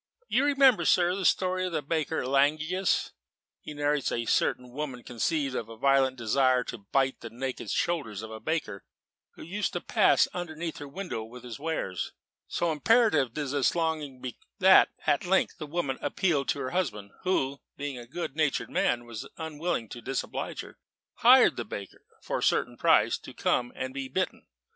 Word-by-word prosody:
"You 265 Hz, +3 st, +2 dB
remember, 275 Hz, -4 st, +5 dB
sir, 180 Hz, -1 st, +4 dB
the 190 Hz, -1 st, -3 dB
story 185 Hz, +1 st, +2 dB
of 180 Hz, -2 st, -3 dB
the 155 Hz, -, -1 dB
baker 160 Hz, +1 st, -1 dB
in -, -, -4 dB
Langius? 155 Hz, +7 st, +1 dB, 0.5 s
He 150 Hz, -, -9 dB
narrates 145 Hz, -1 st, +1 dB
that -, -, -1 dB
a 120 Hz, 0 st, -2 dB
certain 125 Hz, +2 st, +1 dB
woman 130 Hz, -3 st, -5 dB
conceived 135 Hz, +3 st, -1 dB
a -, -, -1 dB
violent 130 Hz, +4 st, +2 dB
desire 130 Hz, +2 st, +2 dB
to 120 Hz, -, -7 dB
bite 130 Hz, +6 st, 0 dB
the 115 Hz, -, -8 dB
naked 130 Hz, +2 st, -5 dB
shoulders 120 Hz, -, -1 dB
of 110 Hz, -, -8 dB
a 110 Hz, -, -7 dB
baker 110 Hz, -6 st, -3 dB, 0.5 s
who -, -, -10 dB
used 200 Hz, +5 st, -2 dB
to -, -, -1 dB
pass -, -, +4 dB
underneath 170 Hz, -2 st, -5 dB
her 145 Hz, -, -7 dB
window 150 Hz, -, -5 dB
with 120 Hz, +2 st, -11 dB
his 120 Hz, 0 st, -8 dB
wares. 145 Hz, -, -3 dB, 0.3 s
So 170 Hz, -1 st, 0 dB
imperative 155 Hz, -, +3 dB
did 145 Hz, -3 st, -2 dB
this 140 Hz, 0 st, +2 dB
longing 155 Hz, -6 st, -2 dB
become, 125 Hz, -2 st, -7 dB, 0.2 s
that 190 Hz, 0 st, +7 dB, 0.2 s
at 145 Hz, -, +2 dB
length 190 Hz, +2 st, +1 dB
the 155 Hz, -, -5 dB
woman 145 Hz, -4 st, -2 dB
appealed 155 Hz, -8 st, 0 dB
to -, -, 0 dB
her 130 Hz, -, -3 dB
husband, 105 Hz, -, -2 dB
who 140 Hz, -7 st, 0 dB, 0.2 s
(being 140 Hz, -3 st, -4 dB
a 120 Hz, -, -10 dB
good 155 Hz, 0 st, -5 dB
natured 140 Hz, -6 st, 0 dB
man, 120 Hz, -, +1 dB
and 120 Hz, -1 st, -11 dB, 0.2 s
unwilling 160 Hz, -5 st, -3 dB
to 120 Hz, -, -8 dB
disoblige 135 Hz, +2 st, -3 dB
her) -, -, -13 dB, 0.4 s
hired -, -, +6 dB
the -, -, -2 dB
baker, 100 Hz, -2 st, -8 dB, 0.2 s
for -, -, -2 dB
a -, -, -4 dB
certain -, -, +1 dB
price, -, -, +3 dB
to -, -, -12 dB
come 120 Hz, 0 st, 0 dB
and 130 Hz, 0 st, -4 dB
be 135 Hz, -1 st, -4 dB
bitten. 185 Hz, +8 st, -3 dB
140 Hz, 185 wpm, -28 LUFS, 125-170 Hz, 0.5 s, that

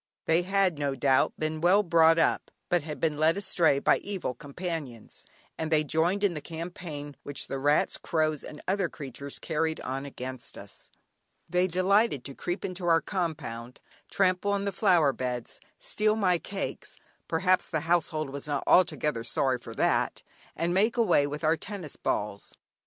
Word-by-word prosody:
They 165 Hz, +2 st, +3 dB
had, 190 Hz, -3 st, +1 dB
no 140 Hz, -2 st, -1 dB
doubt, 130 Hz, 0 st, +3 dB
been 155 Hz, 0 st, -2 dB
well 190 Hz, +5 st, +5 dB
brought 165 Hz, -2 st, +5 dB
up, 165 Hz, -, +2 dB, 0.2 s
but 175 Hz, -1 st, +3 dB
had 150 Hz, -2 st, -7 dB
been 155 Hz, -1 st, 0 dB
led 160 Hz, +4 st, +3 dB
astray 180 Hz, -7 st, +2 dB
by -, -, +3 dB
evil 195 Hz, -10 st, -3 dB
companions, 145 Hz, -5 st, -7 dB, 0.3 s
and 160 Hz, -, -2 dB
they 155 Hz, -1 st, +4 dB
joined 170 Hz, +7 st, +1 dB
in 200 Hz, -3 st, +3 dB
the 150 Hz, -, -5 dB
campaign 160 Hz, -3 st, -7 dB
which 145 Hz, -, -4 dB
the 135 Hz, -, -4 dB
rats, 145 Hz, +2 st, +2 dB
crows, 155 Hz, -2 st, 0 dB
and 150 Hz, -, -10 dB
other 190 Hz, -2 st, +1 dB
creatures 140 Hz, 0 st, -7 dB
carried 160 Hz, 0 st, -1 dB
on 135 Hz, +1 st, -4 dB
against 130 Hz, -2 st, -7 dB
us. -, -, -10 dB, 0.6 s
They 180 Hz, +1 st, +2 dB
delighted 185 Hz, -, +2 dB
to 140 Hz, -, -6 dB
creep 175 Hz, +6 st, -4 dB
into 180 Hz, -1 st, -4 dB
our 165 Hz, -1 st, +5 dB
compound, 150 Hz, -, -4 dB, 0.3 s
trample 190 Hz, +1 st, +2 dB
on 200 Hz, 0 st, -1 dB
the 200 Hz, -, 0 dB
flower 175 Hz, -8 st, +3 dB
beds, 125 Hz, -1 st, -4 dB, 0.2 s
steal 215 Hz, 0 st, 0 dB
my 185 Hz, -5 st, +2 dB
cakes 195 Hz, +3 st, -5 dB, 0.3 s
(perhaps 180 Hz, +2 st, +2 dB
the 160 Hz, -3 st, -1 dB
household 160 Hz, -3 st, 0 dB
was 140 Hz, +1 st, -6 dB
not 145 Hz, -2 st, -1 dB
altogether 150 Hz, -9 st, +3 dB
sorry 130 Hz, +2 st, 0 dB
for -, -, -10 dB
that), -, -, +1 dB, 0.3 s
and 170 Hz, +1 st, 0 dB
make 215 Hz, +6 st, +2 dB
away 175 Hz, -11 st, +4 dB
with 150 Hz, +2 st, -6 dB
our 160 Hz, +1 st, +4 dB
tennis 180 Hz, -2 st, -7 dB
balls. 105 Hz, -1 st, -3 dB
160 Hz, 170 wpm, -28 LUFS, 145-180 Hz, 0.6 s, well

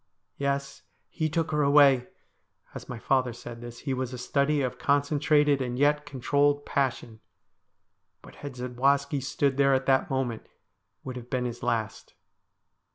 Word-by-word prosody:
' -, -, -53 dB
Yes. 140 Hz, 0 st, -2 dB, 0.3 s
He 155 Hz, -2 st, -2 dB
took 165 Hz, +1 st, -1 dB
her 150 Hz, -1 st, +1 dB
away.' 140 Hz, -3 st, +5 dB, 0.7 s
As -, -, -9 dB
my 125 Hz, -, -5 dB
father 130 Hz, +1 st, +1 dB
said 120 Hz, 0 st, -10 dB
this, 120 Hz, 0 st, -9 dB
he 135 Hz, -, -2 dB
was 130 Hz, -1 st, -3 dB
a -, -, -5 dB
study 140 Hz, +3 st, +1 dB
of 125 Hz, -1 st, -3 dB
concentrated 145 Hz, 0 st, +2 dB
and 125 Hz, -1 st, -3 dB
yet 150 Hz, +2 st, +2 dB
controlled 145 Hz, +2 st, +1 dB
passion, 120 Hz, -5 st, -2 dB, 1.0 s
but -, -, -14 dB
had 145 Hz, -3 st, -8 dB
Zadwaski 135 Hz, +3 st, 0 dB
stood 140 Hz, 0 st, 0 dB
there 140 Hz, -1 st, +4 dB
at 130 Hz, -, -1 dB
that 135 Hz, -1 st, +2 dB
moment 130 Hz, -4 st, -2 dB
it -, -, -30 dB, 0.5 s
would 130 Hz, -1 st, -6 dB
have 120 Hz, 0 st, -10 dB
been 125 Hz, -2 st, -1 dB
his 120 Hz, 0 st, -5 dB
last. 110 Hz, -2 st, -3 dB
135 Hz, 160 wpm, -27 LUFS, 125-145 Hz, 1.0 s, away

